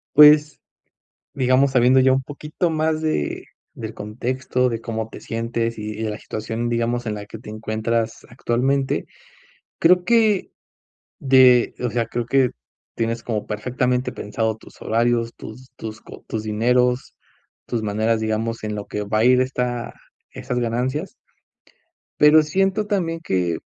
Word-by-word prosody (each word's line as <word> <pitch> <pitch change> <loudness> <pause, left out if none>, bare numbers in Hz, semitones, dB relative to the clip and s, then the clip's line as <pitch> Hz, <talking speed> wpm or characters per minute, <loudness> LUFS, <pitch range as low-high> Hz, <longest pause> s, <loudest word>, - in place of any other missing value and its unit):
Pues, 150 0 +7 0.7
digamos, 130 +1 +3
sabiendo 125 +1 +5
ya 130 0 +5
un 135 +1 +2
poquito 150 +5 -3
más 155 0 0
de 155 - -2 0.3
del - - -7
contexto, 125 +4 -2
de 115 -2 -3
cómo 110 -1 -4
te - - -11
sientes 115 0 -2
y 110 +1 -5
de 110 - -1
la 105 +1 -5
situación, 110 +2 -4
digamos, 120 +1 -1
en 110 -1 -2
la 105 0 -7
que 110 - -9
te 110 - -11
encuentras 110 +1 -2
actualmente. 130 +3 0 0.7
Creo 180 +2 +5
que 220 -2 +2 0.7
de 130 -3 +5
O 125 -1 -1
sea, 120 -1 -1
creo 120 +1 -3
que 130 0 +3 0.5
tienes 115 0 -1
como 110 -3 -3
perfectamente 125 +3 -1
pensado 110 +1 -2
tus - - -17
horarios, 115 +1 +1
tus 125 +4 -11
tus 110 0 -7
co - - -13
tus 110 -1 -3
dineros. 125 +4 +1 0.5
Tus 120 - -2
maneras, 110 +2 0
digamos, 110 +1 -2
en 105 0 -3
lo 105 -1 -5
que 105 - -3
va 105 +1 -1
a - - +3
ir, 125 +1 +5
esta 125 -2 -2 0.4
esas 125 -1 -4
ganancias. 125 +4 -2 1.1
Pero 150 +1 +7
siento, 195 +6 0
también, 170 -5 -1
que 90 - -1
120 Hz, 150 wpm, -22 LUFS, 110-130 Hz, 1.1 s, Pues